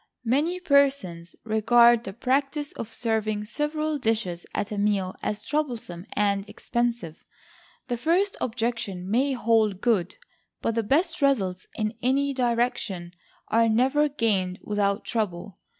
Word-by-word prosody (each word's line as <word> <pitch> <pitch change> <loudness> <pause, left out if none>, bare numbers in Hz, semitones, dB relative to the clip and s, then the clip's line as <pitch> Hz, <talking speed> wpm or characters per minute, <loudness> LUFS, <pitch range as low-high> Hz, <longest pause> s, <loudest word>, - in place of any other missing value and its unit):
Many 300 +10 +1
persons 275 - +1
regard 235 +2 +4
the 195 - -6
practice 275 +5 -1
of 230 - -7
serving 220 -2 -1
several 300 +4 -2
dishes 220 -8 -1
at 205 - -3
a 210 - -3
meal 200 -3 +1
as 210 0 -3
troublesome 240 - -3
and 200 -1 0
expensive. 235 -9 -3 0.6
The 245 - -2
first 350 +9 +1
objection 225 -6 -2
may 265 +5 +2
hold 220 -5 +2
good; 205 -6 +1 0.4
but 230 - -1
the 230 - +1
best 315 - +1
results 195 -10 +1
in 215 0 -1
any 275 +3 +1
direction 235 -8 -1 0.4
are 230 0 +3
never 265 +7 +3
gained 200 -9 0
without 205 0 0
trouble. 195 -5 -3
230 Hz, 130 wpm, -26 LUFS, 205-270 Hz, 0.6 s, regard